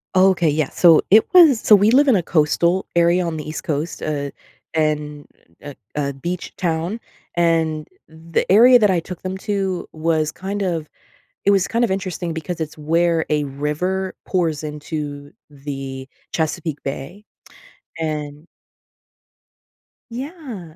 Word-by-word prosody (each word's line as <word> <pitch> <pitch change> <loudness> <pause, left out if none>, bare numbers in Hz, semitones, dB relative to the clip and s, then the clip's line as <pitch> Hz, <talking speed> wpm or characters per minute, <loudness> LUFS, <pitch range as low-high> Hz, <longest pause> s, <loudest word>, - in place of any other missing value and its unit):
Okay, 185 -3 +4
yeah. 150 -1 0
So, 165 -3 +5
it 215 +1 +6
was 315 -10 +7
So, 215 - +7
we 205 +2 +4
live 280 +4 +5
in 255 - +5
a 180 - +1
coastal 170 +3 +1
area 170 +1 +3
on 165 -2 -3
the 150 - -6
East 155 - -5
Coast, 155 +2 -3
eh, 145 -2 -3 0.4
and 150 -2 -1 0.3
a 145 -1 -9 0.2
a 140 -1 -1
beach 170 +7 -5
town, 170 +5 -2 0.4
and 165 -2 +1 0.2
the 160 +2 -3
area 245 +4 +8
that 210 -2 +4
I 180 -2 +2
took 175 +1 -8
them 185 0 -4
to 195 -4 -2
was 155 -1 0
kind 200 +2 -4
of 165 -5 -2 0.6
it 200 - +4
was 195 -2 +3
kind 235 +1 +1
of 215 - 0
interesting 185 -3 -3
because 160 +2 -5
it's 155 -1 -5
where 165 +2 +1
a 150 -1 +1
river 150 +7 -2
pours 165 -5 0
into 150 -1 -6 0.2
the 135 -2 -7 0.2
Chesapeake 160 -1 -2
Bay, 140 +9 -7 0.7
and 150 0 -4 1.7
Yeah, 250 - -8
165 Hz, 145 wpm, -20 LUFS, 150-190 Hz, 1.7 s, area